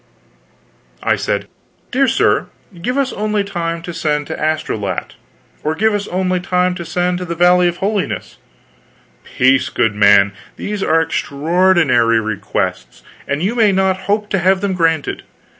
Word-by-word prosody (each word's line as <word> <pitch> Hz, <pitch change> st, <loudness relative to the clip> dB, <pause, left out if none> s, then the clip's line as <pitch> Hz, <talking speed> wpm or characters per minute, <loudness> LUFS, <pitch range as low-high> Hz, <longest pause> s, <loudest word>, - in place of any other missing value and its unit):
I -, -, +2 dB
said: -, -, -2 dB, 0.4 s
"Dear 270 Hz, +2 st, +2 dB
sir, -, -, +2 dB, 0.3 s
give 250 Hz, +8 st, -2 dB
us 275 Hz, -1 st, 0 dB
only 210 Hz, 0 st, -1 dB
time 170 Hz, -4 st, -4 dB
to 175 Hz, -1 st, -6 dB
send 150 Hz, -2 st, -1 dB
to -, -, -5 dB
Astolat; 110 Hz, -, -2 dB, 0.5 s
or 155 Hz, +1 st, -1 dB
give 220 Hz, +4 st, +2 dB
us 205 Hz, -1 st, -2 dB
only 185 Hz, 0 st, 0 dB
time 180 Hz, 0 st, +1 dB
to 175 Hz, -1 st, -7 dB
send 180 Hz, +1 st, -1 dB
to 180 Hz, -, -4 dB
the 170 Hz, -1 st, -4 dB
Valley 180 Hz, +1 st, +4 dB
of 175 Hz, 0 st, -2 dB
Holiness 200 Hz, 0 st, -3 dB, 0.5 s
" -, -, -34 dB
"Peace, 130 Hz, +1 st, +3 dB
good 115 Hz, -3 st, +1 dB
man, 100 Hz, -1 st, +5 dB, 0.2 s
these 210 Hz, -1 st, -4 dB
are 165 Hz, -3 st, +3 dB
extraordinary 150 Hz, -7 st, +2 dB
requests, 110 Hz, -3 st, -3 dB, 0.2 s
and 140 Hz, +3 st, -2 dB
you 205 Hz, +5 st, 0 dB
may 225 Hz, -4 st, +3 dB
not 190 Hz, 0 st, +2 dB
hope 210 Hz, 0 st, +1 dB
to 195 Hz, -, +1 dB
have 190 Hz, +2 st, +2 dB
them 200 Hz, -2 st, -1 dB
granted. 165 Hz, -4 st, 0 dB
175 Hz, 160 wpm, -17 LUFS, 150-195 Hz, 0.5 s, man